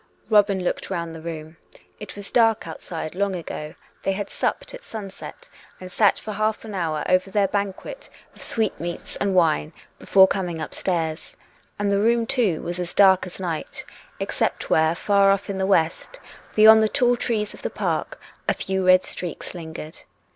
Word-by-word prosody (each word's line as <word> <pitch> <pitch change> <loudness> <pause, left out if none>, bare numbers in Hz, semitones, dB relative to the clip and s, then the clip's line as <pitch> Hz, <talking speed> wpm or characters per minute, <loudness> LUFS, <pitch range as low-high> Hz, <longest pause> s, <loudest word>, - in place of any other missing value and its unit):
Robin 200 -3 +4
looked - - -2
round 170 -3 -3
the 160 - -9
room. 160 -1 -7 0.4
It 210 - -9
was 200 -1 -9
dark 225 -6 +3
outside 160 0 -6
long 195 +1 -1
ago; 155 -3 -6 0.3
they 195 - 0
had 200 +1 -5
supped - - -2
at - - -9
sunset, 220 - -9 0.3
and 185 0 -9
sat 205 +1 +3
for 215 - -7
half 215 +2 -1
an 215 - -7
hour 160 -5 -1
over 185 +1 +2
their 200 0 +2
banquet 200 - -4 0.2
of - - -15
sweetmeats 175 -6 -2
and 195 -2 0
wine 160 -2 +2 0.3
before 190 -1 +6
coming 180 -5 -2
upstairs. 160 0 -3 0.4
And 205 -1 0
the 200 - +2
room, 230 +1 +3
too, 225 -10 +1
was 175 +1 -4
as 175 -1 -5
dark 190 -2 +5
as 180 - -10
night, 170 -4 -4 0.3
except - - -2
wrhere 160 +1 +3
far 200 0 +3
off 200 0 +1
in 190 - -4
the 190 - 0
west, 180 - 0 0.4
beyond 220 +1 +8
the 215 - +2
tall 245 +1 +3
trees 220 -3 -2
of - - -12
the - - -2
park, - - -2 0.3
a - - +2
few 190 0 -2
red 185 0 +6
streaks 175 -3 -4
lingered. 160 -2 -8
190 Hz, 175 wpm, -23 LUFS, 170-210 Hz, 0.4 s, beyond